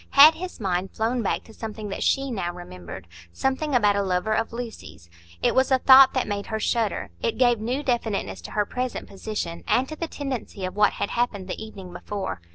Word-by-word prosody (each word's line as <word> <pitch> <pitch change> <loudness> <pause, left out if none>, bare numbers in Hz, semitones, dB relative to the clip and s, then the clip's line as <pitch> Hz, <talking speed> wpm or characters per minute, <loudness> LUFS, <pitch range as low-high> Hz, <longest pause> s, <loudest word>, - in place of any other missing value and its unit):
Had 300 +3 +11
his 360 0 -7
mind 190 -2 -1
flown 230 +4 -1
back 205 - -1
to 220 - -15
something 215 -1 -6
that 195 - -5
she 275 -1 +1
now 185 -6 -2
remembered,—something 90 - -5
about 205 -4 +4
a 200 - +1
lover 190 +2 0
of 225 +1 0
Lucy's? 230 - -8 0.3
It - - +3
was 260 0 +3
a 265 - +5
thought 265 +1 +8
that 255 - +1
made 205 -1 -3
her 220 -1 -2
shudder; 225 -1 -1
it 230 - -1
gave 245 -3 +4
new 250 +6 -2
definiteness 220 - -1
to - - -9
her 210 -1 +1
present 250 +3 -4
position, 195 -4 -5
and 260 +2 +2
to 310 - -5
the 335 +2 -4
tendency 255 -10 -5
of 185 - -5
what 210 0 +4
had - - -3
happened 215 -6 -1
the 195 - -5
evening 195 -5 -10
before. 190 - -5
220 Hz, 205 wpm, -25 LUFS, 190-250 Hz, 0.3 s, Had